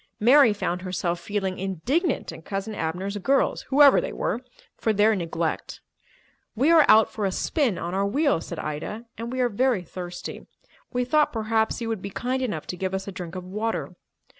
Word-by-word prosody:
Mary 255 +2 +6
found 180 -3 -2
herself 180 -2 -2
feeling 190 0 -3
indignant 215 - -1
at 160 - -11
Cousin 195 +4 -4
Abner's 185 +4 -3
girls, 270 +8 +1
whoever 280 +1 +7
they - - -4
were, 235 - -2 0.3
for 220 - 0
their 215 +2 +4
neglect. 165 -3 -3 0.8
"We 275 +8 +3
are 320 -3 +7
out 220 0 +6
for 215 - -4
a 195 - +1
spin 255 - 0
on 175 +1 -4
our 195 +1 +1
wheels," 280 - +1
said - - -6
Ida, 155 +10 -5
"and 230 +1 -4
we 255 0 -1
are 250 - +3
very 240 -3 +1
thirsty. 180 +1 -7 0.4
We 250 -1 0
thought 300 +4 +3
perhaps 220 0 0
you 230 - -2
would 220 -4 -2
be 200 - -5
kind 255 +6 -2
enough 210 -12 -3
to - - -5
give 190 +1 -2
us 190 +1 -4
a - - -4
drink 180 -2 -7
of 185 - -5
water." 210 +5 -3
210 Hz, 190 wpm, -25 LUFS, 185-245 Hz, 0.8 s, whoever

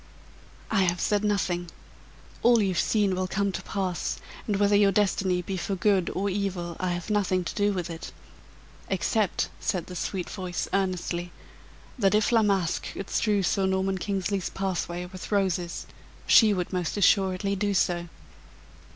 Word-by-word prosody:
"I 220 -3 +3
have 175 0 0
said 210 0 +1
nothing 180 -4 0 0.7
all 240 0 +5
you've 190 -4 +1
seen 205 -3 +2
will 185 0 -1
come 200 +1 0
to - - -4
pass, 185 -4 -2 0.3
and 210 - +1
whether 205 +1 +3
your 200 -1 +5
destiny 190 -2 +1
be 190 +2 -3
for 195 +2 -2
good 190 -1 +2
or 195 +2 0
evil, 185 -3 -2
I 185 -1 0
have 175 +4 -4
nothing 190 -3 +1
to - - -4
do 205 0 +2
with 180 -4 -2
it, 165 0 -7 0.8
except," 195 +1 0
said 175 -3 -1
the 180 - -9
sweet 180 0 -3
voice, 185 -3 -4
earnestly, 180 -2 -1 0.7
"that 195 -1 +3
if 215 +2 +2
La 230 -1 +5
Masque 195 -5 0
could 195 - -7
strew 205 -3 +2
Sir 190 +1 +1
Norman 190 0 0
Kingsley's 195 -1 -1
pathway 180 -2 -3
with 185 +3 -9
roses, 185 -4 0 0.4
she 220 -2 +7
would 185 -2 -2
most 180 +1 -1
assuredly 195 0 +3
do 200 0 0
so." 175 -1 +1
190 Hz, 160 wpm, -27 LUFS, 180-200 Hz, 0.8 s, she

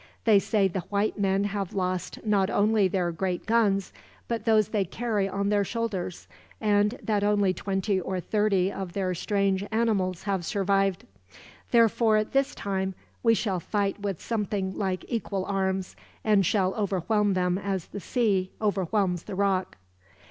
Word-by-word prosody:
They 215 -3 +6
say 200 -1 +2
the 190 +1 -3
white 205 +3 -1
men 195 0 +2
have 200 -2 -3
lost 185 +2 -2
not 200 -3 +2
only 210 -1 +3
their 180 -2 0
great 180 +1 -2
guns, 210 -4 +2 0.3
but 230 -2 -3
those 215 -3 +4
they 210 -2 +1
carry 210 0 -1
on 200 +1 -1
their 205 -1 +3
shoulders; 200 -5 -3 0.3
and 210 +1 +2
that 210 -2 0
only 205 -2 +3
twenty 195 0 -1
or 185 +1 -3
thirty 200 -1 +1
of 190 -3 -6
their 185 -2 -1
strange 195 +1 0
animals 205 -6 0
have 195 -3 -1
survived. 195 -1 0 0.6
Therefore, 225 -2 +4
this 270 +5 0
time, 190 -1 -2 0.3
we 230 -1 +4
shall 195 -5 -1
fight 200 +2 -1
with 200 -4 -3
something 205 -4 -2
like 190 -2 -2
equal 200 -5 -2
arms, 190 -1 -1 0.3
and 210 -2 +4
shall 190 -3 +2
overwhelm 205 0 +1
them 180 0 +1
as 195 -3 -2
the 200 - -7
sea 195 -3 0
overwhelms 195 -3 0
the 195 - -6
rock." 195 -1 0
200 Hz, 155 wpm, -27 LUFS, 190-210 Hz, 0.6 s, They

